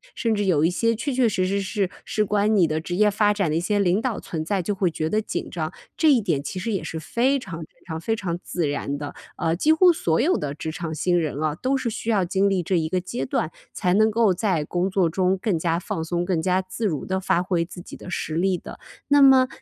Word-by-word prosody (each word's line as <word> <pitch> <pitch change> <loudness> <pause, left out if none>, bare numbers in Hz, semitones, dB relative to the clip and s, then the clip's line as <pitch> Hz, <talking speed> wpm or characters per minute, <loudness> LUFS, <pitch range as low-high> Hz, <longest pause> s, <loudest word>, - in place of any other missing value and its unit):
甚 230 -2 0
至 205 -1 0
有 160 -5 +3
一 170 - +2
些 230 +5 +1
确 260 +5 -3
确 250 -2 +3
实 185 -2 0
实 200 +2 0
是 195 0 -1 0.2
事 215 - 0
关 210 +1 +2
你 185 -4 +5
的 155 0 -1
职 175 +2 -4
业 210 +2 +4
发 205 0 +3
展 205 -3 0
的 155 - 0
一 - - +2
些 205 +5 0
领 195 +1 +2
导 235 -3 -2
存 160 -2 -4
在， 190 +2 -1
就 205 - -1
会 190 -2 +1
觉 155 -1 -2
得 215 +6 +1
紧 - - -4
张， 160 -3 -3 0.2
这 315 -2 +4
一 265 - +5
点 175 -10 0
其 - - -5
实 225 +5 -3
也 195 - -2
是 160 - -5
非 245 - +1
常 190 -10 -7
非 155 - -8 0.2
常 160 -2 -5
非 225 +5 0
常 175 -6 -3
自 170 -4 -2
然 145 0 -2
的。 145 0 -6 0.2
呃， 165 +1 0
几 300 - +3
乎 345 +2 +6
所 165 - 0
有 325 +9 +3
的 145 -1 -4
职 160 - -4
场 160 -1 -5
新 175 +2 +1
人 150 -3 -3
啊， 155 - +1
都 260 - 0
是 245 -3 -2
需 220 - -4
要 200 -5 +2
经 195 +3 +2
历 190 -2 0
这 185 - 0
一 160 -2 0
个 185 - +1
阶 175 -8 -4
段 155 +4 -1 0.2
才 180 0 0
能 215 +2 +4
够 220 -3 +3
在 180 -5 0
工 180 +4 -1
作 190 -2 +2
中 185 +3 +1
更 185 -4 0
加 165 0 0
放 165 -2 -3
松、 175 +2 -1
更 175 -3 0
加 185 +2 +2
自 185 +4 -3
如 155 -7 -3
地 190 0 -1
发 180 -1 +1
挥 180 -2 0
自 175 +1 -10
己 - - -10
的 - - -10
实 165 - -3
力 180 +3 +1
的。 - - -10 0.3
那 285 0 +6
么 265 -1 +7
185 Hz, 290 characters per minute, -24 LUFS, 165-215 Hz, 0.3 s, 么